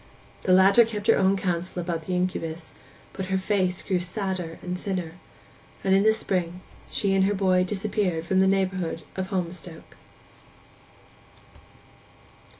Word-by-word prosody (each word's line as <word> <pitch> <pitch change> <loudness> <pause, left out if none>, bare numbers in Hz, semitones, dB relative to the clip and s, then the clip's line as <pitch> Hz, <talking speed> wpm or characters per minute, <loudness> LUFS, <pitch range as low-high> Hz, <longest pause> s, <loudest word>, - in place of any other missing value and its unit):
The 185 - 0
latter 195 +5 +7
kept 210 -2 -5
her - - +5
own 195 +1 +3
counsel 180 -1 -2
about 170 -2 -3
the 185 - -1
incubus, 165 -2 -3 0.4
but 190 -1 -5
her 190 0 +1
face 190 -2 0
grew 185 -2 0
sadder 180 -2 -4
and 180 0 -3
thinner; 180 -3 -3 0.7
and 190 - +2
in 195 - +5
the 220 +2 +5
spring 180 -5 -1 0.3
she 200 -3 +1
and 190 0 +3
her 205 +1 +1
boy 185 -2 +3
disappeared 195 -3 -1
from 190 +2 +2
the 190 - +4
neighbourhood 185 -4 0
of 190 0 -3
Holmstoke. 175 -3 -5
185 Hz, 145 wpm, -25 LUFS, 180-195 Hz, 0.7 s, latter